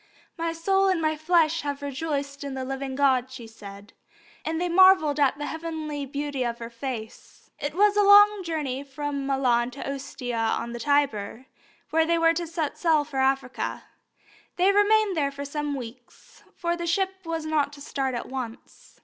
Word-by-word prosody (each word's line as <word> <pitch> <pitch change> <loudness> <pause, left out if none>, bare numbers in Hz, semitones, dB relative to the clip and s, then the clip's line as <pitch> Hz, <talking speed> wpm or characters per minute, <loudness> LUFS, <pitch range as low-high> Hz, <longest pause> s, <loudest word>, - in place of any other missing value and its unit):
"My 335 -1 -2
soul 385 +4 +2
and 375 -3 +2
my 310 -1 +1
flesh 325 0 +2
have 285 -1 -4
rejoiced 280 0 -3
in 280 -1 -5
the 260 -1 -4
living 270 0 -4
God," 260 -2 +2
she 260 -3 -9
said, 205 -2 -12 0.5
and 320 0 -2
they 355 - 0
marvelled 350 -5 +5
at 280 -1 +3
the 295 - -4
heavenly 315 -3 -5
beauty 285 0 -3
of 235 -1 -2
her 235 0 -8
face. 235 -2 -8
It 290 +2 -4
was 410 +2 +4
a 415 - +4
long 410 0 +7
journey 300 -6 -3
from 280 0 -4
Milan 250 -3 +2
to 270 +2 -8
Ostia 250 -3 -5 0.2
on 235 0 -5
the 240 - -6
Tiber, 265 -5 0 0.5
where 320 0 +3
they 335 0 +2
were 330 0 +4
to 340 0 -3
set 320 -3 -3
sail 320 -4 +3
for 285 -2 -5
Africa. 265 -1 -1 0.7
They 370 +2 +4
remained 410 0 +3
there 285 -3 +1
for 280 0 -7
some 295 0 -3
weeks, 245 -1 -11
for 340 -1 -1
the 345 0 -4
ship 380 +2 -1
was 330 -2 -4
not 305 -2 +1
to 290 - -12
start 270 -2 -2
at 240 - -4
once. 255 -2 -8
290 Hz, 185 wpm, -26 LUFS, 265-330 Hz, 0.7 s, long